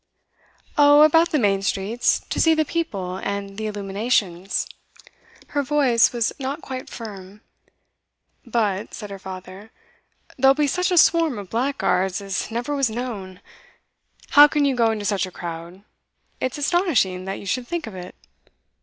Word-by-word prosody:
'Oh, 290 +1 +7
about 325 +2 +5
the 305 - +1
main 200 -6 +2
streets 200 +4 0
to - - -1
see 325 -1 +5
the 315 0 +1
people 200 - -3
and 200 0 -4
the 220 - -2
illuminations.' 200 -2 -1 0.8
Her 290 - 0
voice 270 -4 +3
was 235 -2 -1
not 275 +4 -4
quite 260 -1 -6
firm. 205 -3 -9 1.0
'But,' 215 -4 -1
said 210 -3 -8
her 195 - -7
father, 190 +2 -9 0.7
'there'll 270 +1 +5
be 300 0 +2
such 360 +6 0
a 360 - +1
swarm 330 -5 +4
of 200 -3 -8
blackguards 225 -7 0
as 195 -1 -3
never 245 +6 -3
was 275 -4 +1
known. 215 -6 -6 0.9
How 290 +1 +9
can 295 -1 +1
you 275 -2 +1
go 230 -2 +3
into 215 -2 -3
such 200 -2 0
a - - -11
crowd? 170 +2 -8 0.6
It's 255 +2 -2
astonishing 280 - +1
that 195 0 -4
you - - -10
should 245 +5 -2
think 345 -1 -3
of 220 - -9
it. 180 -1 -9
225 Hz, 155 wpm, -22 LUFS, 195-285 Hz, 1.0 s, How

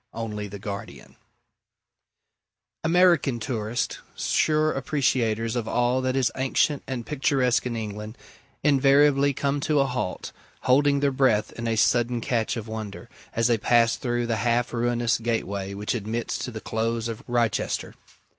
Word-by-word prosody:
ONLY 105 -2 -4
THE 100 +1 -8
GUARDIAN 100 0 -8 1.7
American 165 -7 +3
tourists, 115 -1 -2 0.2
sure 155 0 +2
appreciators 125 -5 0
of 120 -2 -2
all 120 +2 +1
that 130 0 -1
is 130 -2 +2
ancient 135 +2 +1
and 125 -3 -4
picturesque 130 -3 +1
in 120 - -3
England, 105 0 -6 0.5
invariably 140 0 +4
come 140 +1 -1
to 150 +1 +1
a 135 - +4
halt, 125 -8 -3 0.3
holding 140 +2 +3
their 140 -1 +2
breath 130 -6 +2
in 115 0 -5
a 115 - +1
sudden 120 +2 +2
catch 115 -2 -1
of 115 -1 -6
wonder, 110 +1 -7 0.3
as 115 - +1
they 120 -2 +3
pass 115 +1 +3
through 120 -1 -2
the 115 -1 -1
half 120 +1 0
ruinous 120 0 +1
gateway 100 -4 -2
which 105 +1 -2
admits 115 +1 -3
to - - -4
the 110 -3 -7
Close 115 +1 -2
of 115 -2 -5
Wrychester. 120 -2 -1
120 Hz, 145 wpm, -25 LUFS, 110-135 Hz, 1.7 s, invariably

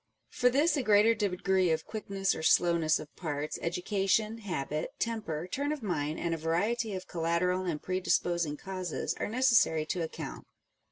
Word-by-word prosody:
For 250 - +3
this 290 +7 +3
a - - +1
greater 215 -1 +5
degree 190 -3 +1
of 160 0 0
quickness 195 -3 -1
or - - -5
slowness 165 -1 +3
of 150 - -11
parts, 150 -3 -4
education, 195 +5 0
habit, 155 -7 -3
temper, 210 - -2
turn 285 +9 -2
of 300 -5 -4
mind, 155 -6 -1
and 170 -1 -1
a - - -1
variety 200 +7 0
of 185 - -6
collateral 175 +2 0
and 165 -4 -2
predisposing 175 -4 0
causes 185 -2 -3
are - - -2
necessary 230 -10 +3
to 175 +2 -2
account. 160 - -6
185 Hz, 160 wpm, -30 LUFS, 165-215 Hz, -, greater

